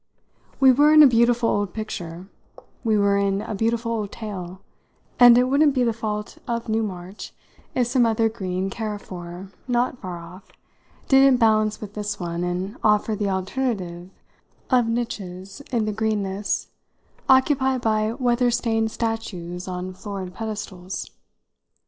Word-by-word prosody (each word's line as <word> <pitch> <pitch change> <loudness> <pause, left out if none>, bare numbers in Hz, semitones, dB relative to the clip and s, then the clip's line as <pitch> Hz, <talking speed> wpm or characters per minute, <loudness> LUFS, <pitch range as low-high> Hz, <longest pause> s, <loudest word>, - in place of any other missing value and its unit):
We 265 -1 +7
were 290 +4 +5
in 305 0 +9
a - - +9
beautiful 235 -1 +3
old 205 -4 -1
picture, 180 -5 -6 0.6
we 220 -3 +2
were 200 -1 +3
in 200 0 0
a - - -5
beautiful 230 +2 0
old 210 -3 -2
tale, 190 -4 -7 0.6
and 245 -1 +9
it 250 - +5
wouldn't 280 +2 +3
be 255 - +3
the 230 -2 +1
fault 210 -2 -4
of 235 0 -2
Newmarch 205 -4 -3 0.5
if 250 - +2
some 245 0 +3
other 225 0 +2
green 190 -3 -3
carrefour, 190 -4 -6 0.2
not 245 +1 0
far 180 -3 -5
off, 170 +4 -12 0.6
didn't 270 -1 +6
balance 215 -2 +2
with 205 -2 -8
this 210 -1 -4
one 170 -1 -3
and 180 +5 -3
offer 210 0 +3
the 205 -1 -1
alternative 190 -3 -3 0.6
of 245 -2 +4
niches, 200 -3 -4
in 230 -4 +1
the 215 - -2
greenness, 205 -2 -1 0.6
occupied 265 -1 +3
by 215 -1 +1
weather 245 -1 +1
stained 225 -2 0
statues 190 -7 -4
on 185 0 -5
florid 190 -1 -6
pedestals. 205 -4 -6
215 Hz, 145 wpm, -23 LUFS, 190-235 Hz, 0.6 s, in